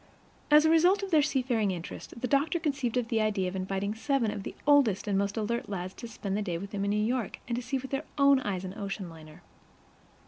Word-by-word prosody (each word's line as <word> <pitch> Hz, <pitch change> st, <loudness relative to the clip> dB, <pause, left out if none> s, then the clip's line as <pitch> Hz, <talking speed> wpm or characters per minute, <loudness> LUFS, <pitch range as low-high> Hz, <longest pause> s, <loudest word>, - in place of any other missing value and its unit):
As 300 Hz, +1 st, +7 dB
a -, -, +5 dB
result 360 Hz, +5 st, +4 dB
of 390 Hz, -, -4 dB
their 310 Hz, -2 st, +6 dB
seafaring 250 Hz, -7 st, +1 dB
interest, 180 Hz, +5 st, -6 dB
the 250 Hz, -, 0 dB
doctor 290 Hz, +5 st, +2 dB
conceived 275 Hz, -7 st, -1 dB
the 225 Hz, -1 st, +1 dB
idea 205 Hz, -3 st, +1 dB
of 180 Hz, -, -4 dB
inviting 195 Hz, +2 st, -2 dB
seven 235 Hz, 0 st, 0 dB
of 205 Hz, -, -5 dB
the -, -, -7 dB
oldest 275 Hz, -9 st, +4 dB
and 200 Hz, -, +1 dB
most 200 Hz, +2 st, 0 dB
alert 235 Hz, +2 st, -2 dB
lads 185 Hz, -2 st, -4 dB
to 235 Hz, -, -8 dB
spend 200 Hz, -3 st, -4 dB
the 210 Hz, -, 0 dB
day 180 Hz, -5 st, -2 dB
with 200 Hz, +3 st, -7 dB
him 200 Hz, -1 st, -2 dB
in 200 Hz, -, 0 dB
New 210 Hz, -, +1 dB
York 240 Hz, -1 st, -1 dB
and 240 Hz, +1 st, -2 dB
see 270 Hz, -, -1 dB
with 265 Hz, 0 st, -7 dB
their 275 Hz, +3 st, -2 dB
own 280 Hz, -1 st, +6 dB
eyes 195 Hz, -6 st, -3 dB
an 185 Hz, -, -6 dB
oceanliner. 175 Hz, -7 st, -7 dB
220 Hz, 230 wpm, -29 LUFS, 195-275 Hz, -, As